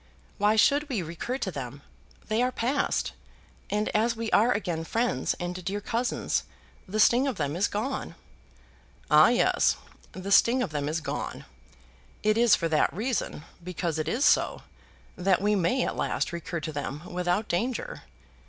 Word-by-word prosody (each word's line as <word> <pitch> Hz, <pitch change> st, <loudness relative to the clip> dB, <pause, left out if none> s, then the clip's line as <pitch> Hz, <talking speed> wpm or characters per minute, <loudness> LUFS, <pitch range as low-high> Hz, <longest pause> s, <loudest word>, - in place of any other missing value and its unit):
"Why 210 Hz, +2 st, +4 dB
should 285 Hz, +7 st, +3 dB
we 220 Hz, -9 st, -1 dB
recur 170 Hz, +10 st, -4 dB
to 195 Hz, -8 st, -3 dB
them? 140 Hz, -1 st, -7 dB, 0.4 s
They 220 Hz, +2 st, +1 dB
are 250 Hz, +1 st, +2 dB
passed, 255 Hz, +4 st, 0 dB, 0.6 s
and 210 Hz, +1 st, 0 dB
as 230 Hz, +2 st, +1 dB
we 225 Hz, -1 st, -4 dB
are 230 Hz, +4 st, +4 dB
again 175 Hz, -7 st, -1 dB
friends 225 Hz, -, 0 dB
and 180 Hz, +1 st, -5 dB
dear 195 Hz, +3 st, -2 dB
cousins 230 Hz, +4 st, -1 dB, 0.5 s
the 210 Hz, +3 st, -3 dB
sting 245 Hz, +5 st, +5 dB
of 265 Hz, -, -1 dB
them 145 Hz, 0 st, -2 dB
is 190 Hz, +4 st, +2 dB
gone." 220 Hz, -3 st, -3 dB, 1.0 s
"Ah, 150 Hz, +8 st, +8 dB
yes! 245 Hz, -, +3 dB, 0.4 s
The 190 Hz, +1 st, -6 dB
sting 245 Hz, +5 st, +5 dB
of 185 Hz, -, -4 dB
them 145 Hz, -1 st, -2 dB
is 160 Hz, +2 st, -2 dB
gone. -, -, -5 dB, 0.8 s
It 215 Hz, 0 st, +3 dB
is 235 Hz, 0 st, +5 dB
for 165 Hz, -, -1 dB
that 155 Hz, -1 st, +2 dB
reason, 220 Hz, -, -2 dB, 0.2 s
because 170 Hz, -2 st, -3 dB
it 155 Hz, -, -2 dB
is 240 Hz, -, +1 dB
so, -, -, +3 dB, 0.5 s
that 185 Hz, 0 st, +2 dB
we 205 Hz, +2 st, +2 dB
may 200 Hz, +7 st, +1 dB
at -, -, -3 dB
last -, -, -1 dB
recur 170 Hz, 0 st, -4 dB
to 155 Hz, 0 st, -5 dB
them 145 Hz, +1 st, -4 dB
without 180 Hz, +4 st, 0 dB
danger. 245 Hz, -, -2 dB
200 Hz, 165 wpm, -27 LUFS, 170-235 Hz, 1.0 s, Ah